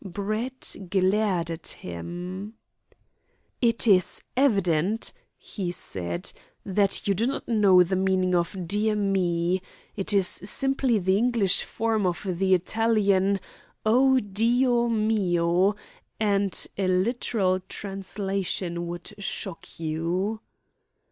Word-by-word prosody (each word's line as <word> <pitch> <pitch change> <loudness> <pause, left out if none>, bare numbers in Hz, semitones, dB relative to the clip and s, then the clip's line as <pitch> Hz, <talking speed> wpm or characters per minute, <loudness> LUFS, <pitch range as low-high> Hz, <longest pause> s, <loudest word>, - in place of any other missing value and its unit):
Brett 215 +7 -4
glared 190 -2 +1
at 165 0 -7
him. 180 - -7 1.1
"It 230 -1 +2
is 190 -5 +4
evident," 200 - +1 0.2
he 185 -4 -5
said, 85 - -4 0.3
"that 200 +2 +1
you 200 - +3
do 220 +5 0
not 270 - -4
know 200 -5 +5
the 185 +2 -2
meaning 185 -1 +1
of 175 +1 -1
'Dear 210 +3 +1
me.' 185 -3 0 0.3
It 195 - -2
is 200 -2 +3
simply 270 +3 +2
the 190 0 +2
English 225 -4 +2
form 220 -3 -1
of 180 +3 -3
the 190 +1 +2
Italian 200 0 +1 0.5
'O 260 +4 +4
Dio 240 +3 +2
mio!' 195 -4 +2 0.4
and 200 -2 +1
a 190 - +1
literal 185 0 +1
translation 190 -2 -4
would 175 +4 -6
shock 195 -4 -5
you." 170 +7 -2
195 Hz, 110 wpm, -26 LUFS, 180-215 Hz, 1.1 s, know